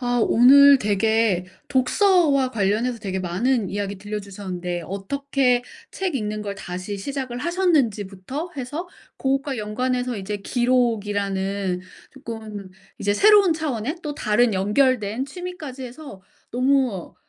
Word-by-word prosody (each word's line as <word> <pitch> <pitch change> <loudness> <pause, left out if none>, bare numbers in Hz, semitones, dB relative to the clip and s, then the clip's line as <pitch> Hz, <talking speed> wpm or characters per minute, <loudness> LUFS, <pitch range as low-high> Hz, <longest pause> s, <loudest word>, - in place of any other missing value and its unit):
아 245 -1 0
오늘 280 +3 +7
되게 210 -3 +1 0.2
독서와 280 -1 +3
관련해서 225 +3 0
되게 190 -3 -3
많은 195 +5 0
이야기 200 0 -3
들려주셨는데 195 -4 -5
어떻게 250 - 0 0.3
책 380 -4 -3
읽는 215 -4 -2
걸 200 -1 -4
다시 185 +1 -6
시작을 260 +2 -4
하셨는지부터 270 - -1
해서 290 +8 -5 0.3
고것과 270 -1 -1
연관해서 250 +3 -2
이제 205 +1 -4
기록이라는 200 -5 0 0.3
쪼끔 220 -7 -8 0.3
이제 205 - +1
새로운 405 - +6
차원의 300 -2 -3
또 295 -2 -4
다른 220 -2 +2
연결된 220 +3 +1
취미까지 300 -5 -7
해서 250 -6 -10 0.3
너무, 255 -6 0
240 Hz, 290 characters per minute, -23 LUFS, 200-275 Hz, 0.3 s, 오늘